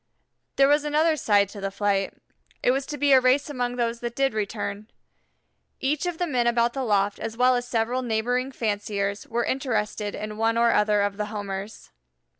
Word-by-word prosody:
There 275 - +5
was 295 +1 +3
another 310 +2 +2
side 205 -7 +3
to 200 -1 -9
the 195 - -2
flight. 195 -1 -1 0.5
It - - +4
was 270 +1 -1
to 295 - -5
be 290 -1 +2
a 260 - +7
race 265 +4 +2
among 245 -3 -2
those 235 -1 -1
that 240 0 -5
did 270 -3 +1
return. 210 0 -4 0.9
Each 295 +5 -1
of 350 -2 -3
the 355 - 0
men 250 -7 0
about 235 0 +2
the 270 - -3
loft 205 -3 +1
as 225 0 -5
well 250 +1 +4
as 245 0 -2
several 240 +1 0
neighboring 245 +3 -1
fanciers 205 -3 -2
were 235 +1 -1
interested 215 -5 -2
in 215 0 -6
one 225 +1 +1
or 235 0 +4
other 210 -1 +3
of 200 0 -2
the 210 - -1
Homers. 205 -1 -6
235 Hz, 195 wpm, -25 LUFS, 210-255 Hz, 0.9 s, a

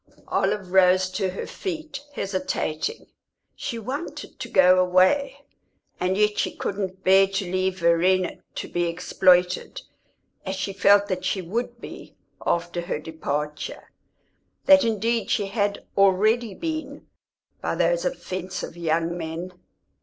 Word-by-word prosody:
Olive 190 -3 0
rose 185 0 +4
to 185 +1 -1
her 185 - -5
feet, 315 -7 -6
hesitating; 185 - -3 0.5
she 240 -4 -4
wanted 260 +9 -6
to - - -6
go 185 -1 +6
away, 260 +11 +2 0.5
and 185 +1 0
yet 210 0 +2
she - - -1
couldn't 190 -1 -4
bear 195 +1 +6
to 195 0 -2
leave 185 0 0
Verena 180 +2 +2 0.2
to - - -4
be 175 0 -1
exploited, 180 +1 +2 0.6
as 190 0 -3
she 195 +1 -3
felt 200 +1 +5
that 185 -2 -3
she 190 - -1
would 235 +6 -3
be - - -10 0.3
after 170 0 -1
her 175 -1 -3
departure, 150 -1 -5 0.7
that 285 0 +7
indeed 230 +1 0
she 205 - +1
had 200 0 -2
already 205 +3 +3
been, 320 -1 -5 0.6
by - - -1
those - - +1
offensive 185 - -4
young 165 0 0
men. 170 +2 -5
190 Hz, 130 wpm, -24 LUFS, 180-220 Hz, 0.7 s, that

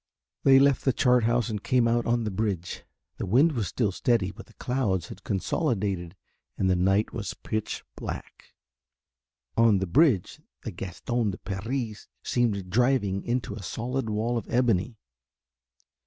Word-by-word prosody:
They 135 -1 +6
left 140 -1 +4
the 130 - +2
chart 125 -2 +3
house 120 +1 +2
and 105 -1 -4
came 125 -2 +3
out 120 0 +1
on 120 0 +1
the 105 - -2
bridge. 95 -4 -3 0.3
The - - -3
wind 135 - +4
was 115 -8 -2
still 110 -6 0
steady 100 -1 +1
but - - -12
the - - -21
clouds 105 -9 -1
had 95 - -10
consolidated 100 - -1 0.4
and 95 - +1
the 95 - +3
night 95 +4 +2
was 105 -5 -4
pitch 110 -1 -4
black. - - -8 1.0
On 115 -3 +5
the 95 - -1
bridge 125 - +2 0.2
the - - -4
Gaston 110 +4 -2
de 95 - -4
Paris 110 +3 -4 0.2
seemed 100 -7 0
driving 115 -4 +2
into 120 -4 -2
a 105 - -7
solid 120 +5 -3
wall 115 +3 0
of - - -12
ebony. 120 -2 +1
110 Hz, 155 wpm, -27 LUFS, 95-125 Hz, 1.0 s, They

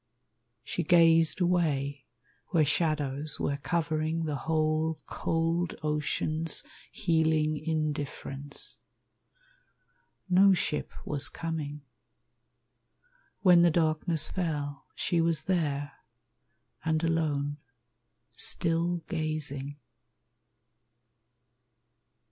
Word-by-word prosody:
She - - -2
gazed 165 0 +5
away 145 -6 +1 0.4
where 160 -3 +3
shadows 150 -1 0
were 140 - 0
covering 160 +1 -1
The 150 -2 -2
whole 155 0 +1
cold 165 +1 -1
ocean's 155 +1 -1 0.3
healing 160 -4 +2
indifference. 145 -2 -2 1.5
No 190 +2 +6
ship 155 -3 -2
was 145 -1 0
coming. 155 -3 -4 1.6
When 180 -3 +7
the 170 - +6
darkness 160 -1 +1
Fell, 145 -6 -3
she 170 -2 +1
was 165 -2 +1
there, 145 -6 0 0.9
and 160 0 0
alone, 150 -3 0 0.8
still 170 0 0
gazing. 150 -3 -3
155 Hz, 75 wpm, -29 LUFS, 150-165 Hz, 1.6 s, When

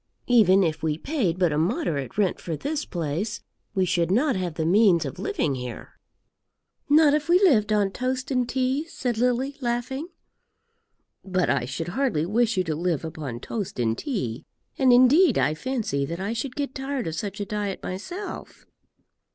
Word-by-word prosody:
Even 205 -6 +5
if 160 -3 -1
we 155 -2 -1
paid 215 - -1
but 180 -3 +2
a 150 - +1
moderate 165 - -1
rent 200 -3 +1
for 165 -3 -4
this 300 - -3
place, 175 +6 -3 0.4
we 190 -1 +2
should 175 -2 +1
not 255 +8 +2
have 180 -4 -3
the 160 - -1
means 180 -2 +4
of 135 - -6
living 145 - -1
here." 125 -2 -7 0.9
"Not 295 0 +6
if 300 +2 0
we 350 - +7
lived 235 - +4
on 205 -2 +2
toast 255 +4 -3
and 250 -2 0
tea?" 265 +4 0
said 245 -8 -3
Lily, 250 +3 0
laughing. 255 +5 -2 1.2
"But 185 -3 0
I 125 -3 0
should 160 +7 -4
hardly 190 - 0
wish 225 +3 +1
you 185 - +3
to 160 -3 -2
live 170 -1 -1
upon 140 -7 -6
toast 200 - -5
and 115 -2 +1
tea; 130 - -3 0.3
and 260 -2 +4
indeed 260 +9 +6
I 135 +3 +2
fancy 185 - -2
that 170 +3 -5
I 200 +4 -2
should 245 +3 -4
get 280 -3 -3
tired 270 -2 -3
of 160 - -3
such 205 +2 -4
a 205 - -2
diet 205 -1 -3
myself." 350 - -7
205 Hz, 175 wpm, -25 LUFS, 165-260 Hz, 1.2 s, we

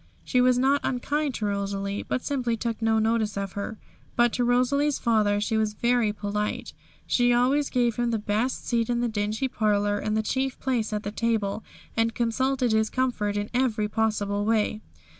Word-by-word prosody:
She 250 - +2
was 250 0 +4
not 275 +3 +3
unkind 280 +2 -1
to 215 - -2
Rosalie, 200 0 -2
but 255 - -3
simply 245 -5 -1
took 230 0 -3
no 225 0 +2
notice 220 -1 +1
of 195 -1 -3
her. 200 +3 -5 0.4
But 240 -1 +3
to 245 - +1
Rosalie's 260 +4 +2
father 215 -3 +2
she 220 +1 0
was 215 -1 0
very 235 -1 +2
polite; 210 0 -3 0.3
she 245 0 +3
always 260 +4 +2
gave 240 -3 +1
him 240 -1 +1
the 230 - +1
best 215 +4 -1
seat 230 -1 +1
in 240 0 +1
the 240 - +1
dingy 215 +3 -1
parlour, 205 -3 +1
and 215 0 -1
the 220 - +1
chief 265 +4 -1
place 240 -5 -1
at 210 0 -2
table, 220 -3 0 0.3
and 225 0 +1
consulted 250 +1 +1
his 220 0 +2
comfort 230 -6 -1
in 205 0 -3
every 240 -4 +1
possible 210 -2 0
way. 215 0 +1
225 Hz, 180 wpm, -26 LUFS, 210-245 Hz, 0.4 s, was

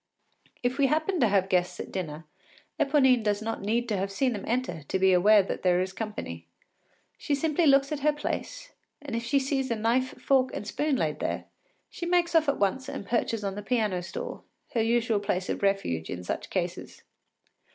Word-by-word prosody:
If 250 +3 0
we 275 - +5
happen 315 +5 0
to 235 - +4
have 195 -2 +2
guests 180 -2 0
at - - -6
dinner, 160 -4 -5 0.5
Eponine 265 -4 +4
does 205 -1 0
not 225 +1 -4
need 230 +4 0
to 210 - 0
have 195 +1 -2
seen 250 +5 +1
them 205 - -5
enter 235 -9 -1
to 145 - -2
be 190 0 +4
aware 205 +3 +6
that - - -4
there 180 -1 +3
is 185 +1 -1
to - - -18
be - - -26
company. 85 - -5 0.7
She 290 - 0
simply 315 +3 +1
looks 275 0 +4
at 300 - -2
her 300 +2 +3
place, - - -5 0.3
and 280 -5 -6
if 230 - -2
she 240 +4 +1
sees 270 -1 0
a 230 - +1
knife, 235 +4 0
fork, 260 -1 +3
and - - -5
spoon 295 +7 0
laid 150 - -1
there, - - -2 0.5
she 345 - -5
makes 350 -1 +2
off 320 -3 +4
at 280 - +1
once 255 +7 0
and 275 -7 -6
perches 230 -1 -1
on 195 -1 -2
the 205 - -6
piano 210 -4 0
stool, 485 - -6 0.3
her 235 - +2
usual 230 -1 +2
place 185 -2 -2
of - - -2
refuge 195 - 0
in 90 - -5
such - - -4
cases. - - -4
230 Hz, 210 wpm, -28 LUFS, 195-275 Hz, 0.7 s, aware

